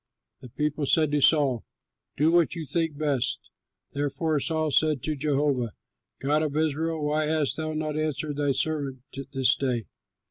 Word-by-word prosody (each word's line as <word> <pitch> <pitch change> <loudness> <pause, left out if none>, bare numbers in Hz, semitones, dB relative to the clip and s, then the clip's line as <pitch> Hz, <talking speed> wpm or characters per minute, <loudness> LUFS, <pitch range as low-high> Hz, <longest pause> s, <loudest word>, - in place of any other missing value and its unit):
The 125 - -12
people 150 +2 -2
said 155 0 +3
to 145 -1 +1
Saul, 135 -6 +4 0.5
"Do 155 +3 +3
what 175 0 +3
you 165 -2 -5
think 160 -1 -1
best." 145 -5 +1 0.5
Therefore 145 +2 -1
Saul 155 0 0
said, 145 -1 +2
"Jehovah, 145 -5 0 0.5
God 150 +3 +1
of 150 -1 -1
Israel, 160 0 0
why 150 +1 +1
hast 155 -2 +1
thou 155 0 -3
not 155 -1 -2
answered 155 -1 -2
thy 145 -1 +1
servant 140 -3 -1 0.3
this 135 -2 +3
day? 125 -4 -1
150 Hz, 150 wpm, -26 LUFS, 140-155 Hz, 0.5 s, Saul